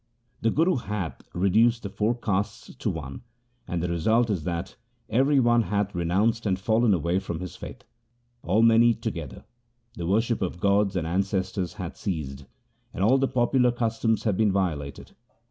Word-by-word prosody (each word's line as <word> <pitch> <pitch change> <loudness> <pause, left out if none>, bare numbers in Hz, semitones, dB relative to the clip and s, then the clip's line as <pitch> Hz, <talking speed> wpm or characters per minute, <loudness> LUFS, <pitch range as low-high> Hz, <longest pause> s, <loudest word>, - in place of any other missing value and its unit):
The 115 - +2
Guru 165 +6 +2
hath 105 -7 -4
reduced 110 +6 +2
the 100 - -4
four 110 +4 0
castes 105 -3 -3
to - - -3
one, 70 -4 -6 0.5
and 85 -1 -2
the - - 0
result 110 +8 +2
is 90 -7 -2
that 85 0 -4 0.4
every 135 +5 +3
one 120 -1 +4
hath 100 0 -1
renounced 100 +7 +1
and 95 -2 +1
fallen 110 +3 +2
away 85 +2 0
from 85 -4 -5
his 90 -3 -7
faith. - - -9 0.6
All 105 +7 +2
men 115 0 +6
eat 115 -1 +3
together. 85 - -5 0.5
The 85 -7 -5
worship 110 +4 +1
of 90 -2 -3
gods 100 +1 +2
and 85 -3 -1
ancestors 95 +1 -1
hath 90 -5 -7
ceased, 70 -8 -4 0.5
and 95 - -1
all 130 +6 +4
the 135 - +2
popular 125 -1 +2
cus 115 -2 -2
toms 115 -2 +1
have 105 -4 0
been 110 -2 +3
violated. 80 -8 -3
100 Hz, 175 wpm, -26 LUFS, 90-115 Hz, 0.6 s, men